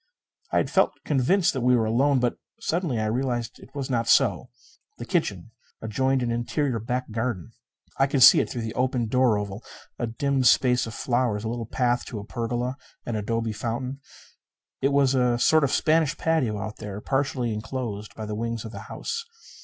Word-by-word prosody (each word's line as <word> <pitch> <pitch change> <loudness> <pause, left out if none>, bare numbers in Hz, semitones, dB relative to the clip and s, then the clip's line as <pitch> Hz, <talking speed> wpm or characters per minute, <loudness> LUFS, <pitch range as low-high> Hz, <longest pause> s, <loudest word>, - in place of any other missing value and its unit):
I - - +2
had - - +1
felt - - +3
convinced 165 +7 +2
that 130 - -2
we 125 +1 +4
were 115 -2 +2
alone. 135 +6 +3
But 125 -1 0 0.2
suddenly 165 -7 -1
I 110 - 0
realized 120 +1 -2
it 135 - -16
was 140 -2 -3
not 115 -3 -1
so. - - +3 0.5
The - - -7
kitchen - - -1 0.3
adjoined 130 +4 0
an 120 - -1
interior 120 +2 -1
back 125 +2 -3
garden. 110 -2 -3 0.5
I 135 - +4
could 135 -2 +3
see - - +9
it - - 0
through 120 - -4
the 110 - -4
opened 125 -3 0
door 125 -4 +3
oval 105 +1 -5 0.4
a 120 - -1
dim 135 +3 0
space 125 0 +4
of 115 - -7
flowers; 120 -4 0
a 110 - -2
little 115 -1 -4
path 120 0 0
to 115 - -6
a 100 - -6
pergola; 120 +3 -3 0.3
an 120 - -3
adobe 115 +1 -1
fountain. 125 +4 -4 0.8
It 135 - +2
was 140 -1 +3
a 125 -2 +2
sort 155 +5 +4
of 140 - +1
Spanish 155 -2 +2
patio 140 -10 +1
out 105 +1 -5
there, 105 -2 -6
partially 135 -1 -1
enclosed 105 -2 -5
by 110 - -6
the 105 - -4
wings 115 +1 -3
of 110 - -7
the - - -8
house. 465 - -4
120 Hz, 195 wpm, -25 LUFS, 115-135 Hz, 0.8 s, see